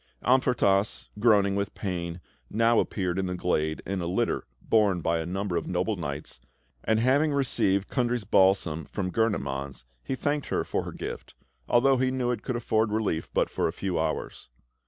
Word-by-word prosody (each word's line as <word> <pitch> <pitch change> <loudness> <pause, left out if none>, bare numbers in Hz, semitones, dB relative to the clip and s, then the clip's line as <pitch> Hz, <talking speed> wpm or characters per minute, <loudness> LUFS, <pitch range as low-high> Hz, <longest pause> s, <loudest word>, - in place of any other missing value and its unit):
Amfortas, 115 -5 +2
groaning 105 -3 +4
with 100 0 -2
pain, 85 -3 -4 0.3
now 115 +1 +3
appeared 95 -2 -1
in 95 - -1
the 90 - -2
glade 80 -3 -1
in 95 -1 -2
a 85 - -2
litter 90 +2 -1
borne 105 -5 +2
by 85 +1 +1
a 80 - -4
number 95 0 -2
of 85 - -3
noble 90 +4 0
knights, 75 -5 -5 0.4
and 110 0 +2
having 140 +6 +3
received 100 -8 +1
Kundry's 120 -3 0
balsam 95 -5 +2
from 95 +1 -3
Gurnemanz, 70 - -1 0.2
he 130 - -2
thanked 145 +2 -1
her - - 0
for - - -2
her - - -5
gift, - - -7 0.3
although 130 +2 +4
he 130 0 +2
knew 130 -1 0
it 115 -3 -3
could 125 - -3
afford 110 -2 +1
relief 105 -7 -1
but - - +2
for - - -1
a - - -1
few 95 -1 -2
hours. - - -3
100 Hz, 175 wpm, -27 LUFS, 90-120 Hz, 0.4 s, groaning